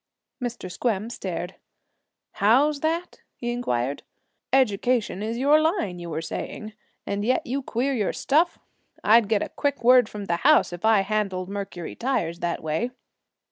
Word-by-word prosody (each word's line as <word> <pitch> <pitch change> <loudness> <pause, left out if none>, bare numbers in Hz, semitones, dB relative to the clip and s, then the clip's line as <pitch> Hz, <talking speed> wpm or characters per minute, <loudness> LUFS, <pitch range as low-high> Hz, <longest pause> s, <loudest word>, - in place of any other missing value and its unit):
Mr. 235 -7 -4
Squem 220 +2 -1
stared. 180 -4 -5 0.7
'How's 275 +8 +3
that?' 330 +4 -2
he 240 0 -3
inquired. 140 - -1 0.5
'Education 240 -4 +2
is 225 +2 -3
your 290 +4 +4
line, 310 - 0
you 170 -1 -7
were 160 0 -3
saying, 215 +6 -6 0.3
and 200 0 -2
yet 250 +4 +1
you 270 +3 -2
queer 260 +2 -1
your 210 -6 0
stuff. 325 +5 +1 0.5
I'd 220 -1 +5
get 215 -2 0
quick 285 -4 -1
word 250 -2 +6
from 205 -1 -6
the 170 -3 0
house, 295 - +4
if 175 +4 -5
I 220 -3 +5
handled 195 -3 -2
Mercury 195 -4 -5
tires 175 -10 -1
that 175 0 -2
way.' 160 +10 -1
220 Hz, 150 wpm, -25 LUFS, 185-255 Hz, 0.7 s, word